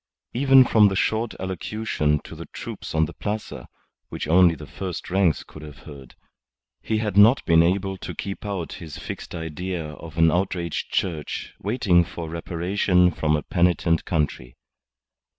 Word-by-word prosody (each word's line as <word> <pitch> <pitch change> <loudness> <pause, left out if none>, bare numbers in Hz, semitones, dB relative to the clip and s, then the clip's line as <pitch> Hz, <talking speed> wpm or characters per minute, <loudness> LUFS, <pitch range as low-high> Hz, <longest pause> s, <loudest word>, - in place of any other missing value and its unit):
Even 135 +1 +6
from 110 -3 +5
the 95 - -1
short 110 +4 0
allocution 95 -5 -1
to - - -11
the - - -9
troops - - -7
on 80 0 +3
the - - -9
Plaza 105 +1 -5 0.4
(which - - -5
only 85 +1 +5
the 75 - -10
first 85 +5 -6
ranks 95 -4 +2
could 80 - -13
have 75 -3 -10
heard) 70 -4 -12 0.7
he 110 - -1
had 105 -3 -2
not 115 +6 +6
been 80 -1 +5
able 95 +3 0
to - - -7
keep 100 -1 -5
out 100 -5 -4
his 80 -4 -8
fixed - - -7
idea 80 0 -4
of 80 +1 -11
an 80 0 +5
outraged 90 -2 -2
Church 80 -6 -3
waiting 100 -5 +2
for 85 -2 -7
reparation 90 +2 +1
from 75 -2 0
a 75 - -2
penitent 85 -2 +1
country. 70 -6 -2
90 Hz, 160 wpm, -24 LUFS, 80-100 Hz, 0.7 s, Even